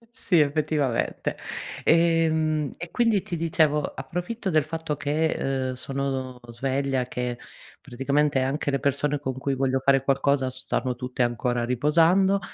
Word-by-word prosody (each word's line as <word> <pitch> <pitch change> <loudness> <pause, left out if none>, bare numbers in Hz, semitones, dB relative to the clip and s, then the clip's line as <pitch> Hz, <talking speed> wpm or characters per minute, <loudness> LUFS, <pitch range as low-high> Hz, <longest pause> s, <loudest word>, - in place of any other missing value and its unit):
Sì, 200 -9 +2
effettivamente. 145 -4 0 0.5
E 165 0 +4
mhmm, 155 -2 0
e 170 - -7
quindi 230 -6 +2
ti 175 - -4
dicevo, 160 -2 +2
approfitto 180 - -4
del 155 -2 +3
fatto 160 -1 -3
che, 155 +3 0
uhm, 130 -1 -1
sono 130 -1 -4
sveglia, 135 +2 -1
che, 125 -1 -3 0.4
praticamente 140 +1 0
anche 135 +3 -1
le 140 -1 0
persone 140 +1 0
con 130 -2 -4
cui 140 0 -1
voglio 135 0 +1
fare 135 -1 +4
qualcosa 135 -1 +1
s 130 - -7
stanno 125 -2 -1
tutte 125 0 -2
ancora 120 0 0
riposando 165 +10 +3
140 Hz, 145 wpm, -25 LUFS, 130-160 Hz, 0.5 s, E